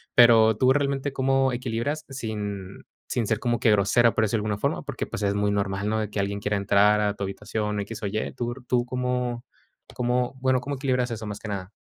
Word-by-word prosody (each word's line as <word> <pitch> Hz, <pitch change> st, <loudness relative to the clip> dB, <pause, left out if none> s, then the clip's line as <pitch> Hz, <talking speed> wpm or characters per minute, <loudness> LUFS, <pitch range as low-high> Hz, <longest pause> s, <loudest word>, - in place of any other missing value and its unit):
Pero, 115 Hz, -2 st, +7 dB
¿tú 130 Hz, +4 st, +3 dB
realmente 140 Hz, 0 st, 0 dB
cómo 135 Hz, 0 st, +2 dB
equilibras 125 Hz, +5 st, -2 dB
sin 105 Hz, -6 st, -5 dB, 0.2 s
sin 115 Hz, -4 st, -1 dB
ser 110 Hz, -1 st, 0 dB
como 120 Hz, -1 st, 0 dB
que 115 Hz, -, +3 dB
grosera, 105 Hz, +3 st, +4 dB
por 110 Hz, -, +2 dB
decirlo 110 Hz, 0 st, +1 dB
de -, -, -3 dB
alguna -, -, -3 dB
forma? -, -, -1 dB
Porque, -, -, -4 dB
pues, -, -, -6 dB
es 100 Hz, 0 st, +1 dB
muy 100 Hz, 0 st, +1 dB
normal, 100 Hz, 0 st, -1 dB
¿no? 110 Hz, 0 st, 0 dB
De 105 Hz, -2 st, -2 dB
que 105 Hz, -, -1 dB
alguien 100 Hz, +1 st, -2 dB
quiera 105 Hz, 0 st, -1 dB
entrar 100 Hz, +1 st, +4 dB
a 105 Hz, -1 st, +1 dB
tu 100 Hz, -, -6 dB
habitación, 105 Hz, +1 st, -3 dB
x 110 Hz, +3 st, -7 dB
o -, -, 0 dB
y. 110 Hz, +2 st, -2 dB
¿Tú 120 Hz, 0 st, -2 dB, 0.2 s
tú 120 Hz, -1 st, +2 dB
cómo 125 Hz, -1 st, -2 dB, 0.5 s
cómo? 125 Hz, +1 st, 0 dB
Bueno, 130 Hz, -1 st, +2 dB
¿cómo 140 Hz, +1 st, -4 dB
equilibras 130 Hz, -2 st, 0 dB
eso, 110 Hz, -1 st, -5 dB
más 105 Hz, 0 st, -5 dB
que 110 Hz, -, -7 dB
nada? 95 Hz, -1 st, -5 dB
110 Hz, 225 wpm, -25 LUFS, 105-125 Hz, 0.5 s, Pero